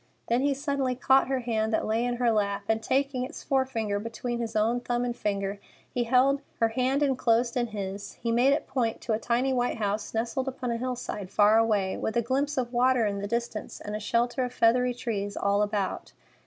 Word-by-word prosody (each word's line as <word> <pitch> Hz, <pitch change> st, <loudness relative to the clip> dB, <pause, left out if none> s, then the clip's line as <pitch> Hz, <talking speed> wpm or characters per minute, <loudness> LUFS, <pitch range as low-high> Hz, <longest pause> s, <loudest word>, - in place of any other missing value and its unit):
Then 240 Hz, +2 st, +2 dB
he 280 Hz, 0 st, +2 dB
suddenly 275 Hz, -2 st, -1 dB
caught 265 Hz, +1 st, +4 dB
her 265 Hz, -1 st, 0 dB
hand 220 Hz, -2 st, -1 dB
that -, -, +1 dB
lay 225 Hz, +2 st, +1 dB
in 245 Hz, 0 st, 0 dB
her 240 Hz, -1 st, +2 dB
lap, 200 Hz, -2 st, 0 dB
and, 225 Hz, 0 st, +1 dB
taking 270 Hz, +1 st, 0 dB
its 255 Hz, -, -7 dB
forefinger 245 Hz, -7 st, 0 dB
between 235 Hz, +2 st, -4 dB
his 230 Hz, -1 st, -4 dB
own 225 Hz, +3 st, +2 dB
thumb 245 Hz, 0 st, -1 dB
and 240 Hz, -1 st, -2 dB
finger, 200 Hz, -1 st, -2 dB, 1.0 s
her 230 Hz, -, +4 dB
hand 260 Hz, +5 st, +1 dB
enclosed 240 Hz, -3 st, +2 dB
in 240 Hz, -1 st, +1 dB
his, 200 Hz, -2 st, -5 dB
he 230 Hz, -, -3 dB
made 245 Hz, +4 st, +4 dB
it 285 Hz, -, +1 dB
point 235 Hz, -4 st, -1 dB
to 230 Hz, -, -1 dB
a 215 Hz, -, 0 dB
tiny 245 Hz, +3 st, +1 dB
white 245 Hz, -1 st, 0 dB
house 205 Hz, -1 st, -2 dB
nestled 235 Hz, +4 st, -2 dB
upon 255 Hz, -2 st, -3 dB
a 230 Hz, -, -1 dB
hillside 245 Hz, -6 st, -4 dB
far 210 Hz, +2 st, +5 dB
away, 210 Hz, -4 st, +1 dB
with 220 Hz, -, -2 dB
a 235 Hz, -, +2 dB
glimpse 275 Hz, +4 st, -1 dB
of 250 Hz, -1 st, -1 dB
water 250 Hz, -1 st, +3 dB
in 200 Hz, -1 st, -1 dB
the 200 Hz, -, -3 dB
distance 235 Hz, -1 st, -3 dB
and 210 Hz, -, -5 dB
a -, -, -3 dB
shelter 240 Hz, +4 st, 0 dB
of 250 Hz, -, -3 dB
feathery 245 Hz, +2 st, +3 dB
trees 205 Hz, -4 st, -3 dB
all 200 Hz, +1 st, +2 dB
about. 205 Hz, -2 st, -2 dB
235 Hz, 210 wpm, -27 LUFS, 215-255 Hz, 1.0 s, far